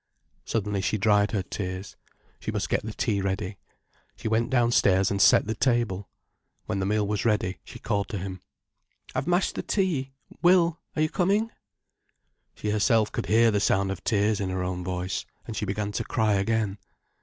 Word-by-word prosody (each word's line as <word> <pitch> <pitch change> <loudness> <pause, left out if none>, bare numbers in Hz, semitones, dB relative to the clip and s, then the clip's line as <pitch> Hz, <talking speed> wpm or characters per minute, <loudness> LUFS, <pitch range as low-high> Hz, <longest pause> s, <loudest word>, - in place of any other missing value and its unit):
Suddenly 105 -3 -1
she 105 - 0
dried 105 0 +3
her 100 -4 -1
tears. 95 0 -5 0.4
She - - -5
must - - -2
get - - 0
the 110 - -4
tea 105 -2 0
ready. 95 0 -3 0.6
She - - -5
went 110 +1 +1
downstairs 115 -7 +3
and 100 -1 0
set - - +6
the 110 - -1
table. 115 -6 0 0.6
When 95 - -2
the 95 - 0
meal 105 0 +1
was 105 -1 -1
ready, 105 -5 0
she - - -11
called 100 -1 -1
to 110 - -3
him. 95 -1 -6 0.7
"I've - - -2
mashed 175 +1 +2
the - - -3
tea, 155 -10 -1 0.3
Will, 175 -2 +4 0.2
are 155 - +2
you 155 - +1
coming?" 205 +7 +1 1.0
She 105 - -2
herself 110 +1 +3
could - - -3
hear 115 +1 +5
the 105 - +1
sound 95 -1 +2
of 95 - -6
tears 105 -1 +2
in 100 -2 -2
her 95 0 -2
own 90 0 -3
voice, 90 +1 -3 0.2
and 115 - -6
she 105 - -2
began 105 +1 -2
to - - -2
cry 110 -2 +1
again. 105 0 0
105 Hz, 185 wpm, -26 LUFS, 95-115 Hz, 1.0 s, set